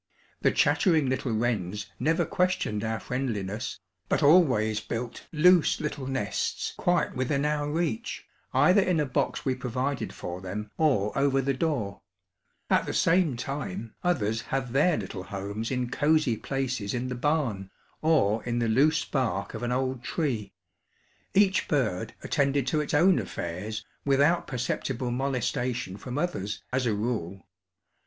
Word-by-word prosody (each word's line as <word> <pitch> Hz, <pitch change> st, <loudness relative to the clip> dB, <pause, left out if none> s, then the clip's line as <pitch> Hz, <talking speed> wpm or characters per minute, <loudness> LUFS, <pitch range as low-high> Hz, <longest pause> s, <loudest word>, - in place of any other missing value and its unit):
The -, -, +4 dB
chattering 160 Hz, -7 st, +3 dB
little 130 Hz, -1 st, -1 dB
wrens 105 Hz, -3 st, -1 dB
never 160 Hz, +6 st, +2 dB
questioned 180 Hz, -, 0 dB
our 110 Hz, 0 st, -1 dB
friendliness, 110 Hz, -5 st, -3 dB, 0.3 s
but -, -, +1 dB
always 130 Hz, -10 st, +5 dB
built 115 Hz, +2 st, -5 dB
loose 175 Hz, +2 st, +5 dB
little 145 Hz, -3 st, -4 dB
nests 130 Hz, -6 st, -2 dB
quite 175 Hz, -5 st, +1 dB
within 140 Hz, +3 st, 0 dB
our 150 Hz, -1 st, 0 dB
reach, 175 Hz, +9 st, -2 dB, 0.3 s
either 195 Hz, +3 st, +5 dB
in 180 Hz, -3 st, +1 dB
a 150 Hz, -, +2 dB
box 130 Hz, -, -1 dB
we 130 Hz, -, +2 dB
provided 125 Hz, 0 st, -2 dB
for 90 Hz, +1 st, -6 dB
them 105 Hz, +3 st, -5 dB
or 130 Hz, -10 st, +2 dB
over 135 Hz, 0 st, +2 dB
the 135 Hz, +1 st, +1 dB
door; 125 Hz, -9 st, -2 dB, 0.7 s
at -, -, +2 dB
the -, -, -2 dB
same 165 Hz, -7 st, +3 dB
time 115 Hz, -6 st, -4 dB
others 115 Hz, -, +1 dB
had 135 Hz, -2 st, -2 dB
their 150 Hz, +4 st, +4 dB
little 95 Hz, -3 st, -5 dB
homes 100 Hz, +4 st, -4 dB
in 125 Hz, -2 st, -1 dB
cozy 150 Hz, -3 st, +2 dB
places 125 Hz, -4 st, -2 dB
in 125 Hz, +1 st, -2 dB
the -, -, -2 dB
barn, 125 Hz, -8 st, 0 dB, 0.3 s
or 125 Hz, -10 st, +3 dB
in 120 Hz, -1 st, -2 dB
the 120 Hz, -1 st, +1 dB
loose 145 Hz, +8 st, +3 dB
bark 100 Hz, -6 st, -1 dB
of 110 Hz, -, -5 dB
an 120 Hz, 0 st, -1 dB
old 130 Hz, -1 st, -1 dB
tree. 120 Hz, -, -2 dB, 0.8 s
Each 195 Hz, -1 st, +4 dB
bird 110 Hz, -, 0 dB
attended 140 Hz, -2 st, +1 dB
to 150 Hz, +3 st, +1 dB
its 150 Hz, -, -2 dB
own 175 Hz, +4 st, +5 dB
affairs 105 Hz, +6 st, -5 dB, 0.2 s
without 145 Hz, +5 st, +3 dB
perceptible 125 Hz, -1 st, -2 dB
molestation 125 Hz, -4 st, -1 dB
from 125 Hz, +6 st, -6 dB
others, 145 Hz, -, -2 dB
as 130 Hz, -1 st, +1 dB
a 110 Hz, -, +2 dB
rule. 100 Hz, -4 st, -3 dB
130 Hz, 150 wpm, -27 LUFS, 110-150 Hz, 0.8 s, always